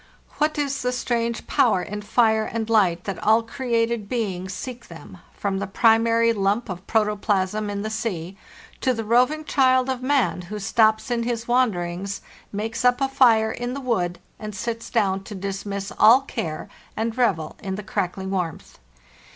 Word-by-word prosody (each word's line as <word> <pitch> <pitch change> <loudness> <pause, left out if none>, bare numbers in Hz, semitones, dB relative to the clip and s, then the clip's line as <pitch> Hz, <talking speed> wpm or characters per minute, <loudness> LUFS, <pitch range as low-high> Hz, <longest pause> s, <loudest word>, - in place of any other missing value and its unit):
What 305 +1 +1
is 280 -1 -1
the 250 - 0
strange 235 -2 -2
power 215 -7 +2
in 210 +1 -5
fire 220 +1 +2
and 225 -1 -3
light 185 -5 +3
that 195 -4 -5
all 220 +2 +4
created 230 -4 -1
be 225 -6 -1
ings 185 +1 -6
seek 245 +4 -7
them, - - -12 0.2
from 195 -1 -1
the 200 - -3
primary 230 +2 +3
lump 205 +2 0
of 185 0 -7
protoplasm 210 -1 0
in 200 0 -3
the 215 - -3
sea 190 -5 -3 0.4
to 255 -2 +1
the 225 - -3
roving 250 +8 +2
child 260 -2 +3
of 260 -1 -2
man, 260 -8 +1
who 210 - -4
stops 220 +3 +2
in 235 -1 +1
his 235 -1 -3
wanderings, 200 -6 0 0.3
makes 225 +3 -3
up 250 +1 +4
a 270 - +2
fire 230 -5 +4
in 245 +2 -4
the - - -4
wood, 185 -10 -1 0.2
and 215 -2 -6
sits 230 +3 -4
down 195 -4 +1
to 210 - -8
dismiss 195 +1 -4
all 235 +5 +8
care 160 - -5 0.3
and 225 +1 -1
revel 195 -11 0
in 190 -2 -3
the 210 - -6
crackling 190 -2 -3
warmth. 180 -5 -4
220 Hz, 175 wpm, -23 LUFS, 195-240 Hz, 0.4 s, all